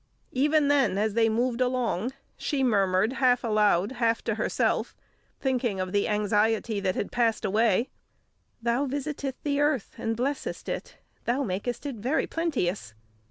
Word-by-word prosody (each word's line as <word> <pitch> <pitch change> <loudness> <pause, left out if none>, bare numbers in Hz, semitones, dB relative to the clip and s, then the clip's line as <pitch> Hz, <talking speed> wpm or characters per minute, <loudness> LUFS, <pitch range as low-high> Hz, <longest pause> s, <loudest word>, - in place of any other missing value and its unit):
Even 290 +3 +3
then, 270 -10 +3
as 215 +1 +1
they 225 0 +3
moved 240 +2 0
along, 250 -3 0 0.2
she 275 -2 -1
murmured 200 -1 +2
half 250 -1 +4
aloud, 210 -3 +2
half 230 -3 0
to 225 - 0
herself, 215 - 0 0.4
thinking 245 -7 0
of 185 0 -2
the 200 +1 +1
anxiety 210 +1 +1
that 190 -2 0
had - - -3
passed 230 -2 +1
away: 220 +3 +2 0.7
"Thou 240 +4 +1
visitest 280 0 -3
the 285 -1 0
earth, 290 -6 +1
and 225 0 -2
blessest 275 +4 -3
it; - - -5 0.3
thou 255 +4 +1
makest 210 +6 -3
it 275 -5 -4
very 255 +9 0
plenteous." 205 - -2
235 Hz, 150 wpm, -27 LUFS, 210-265 Hz, 0.7 s, half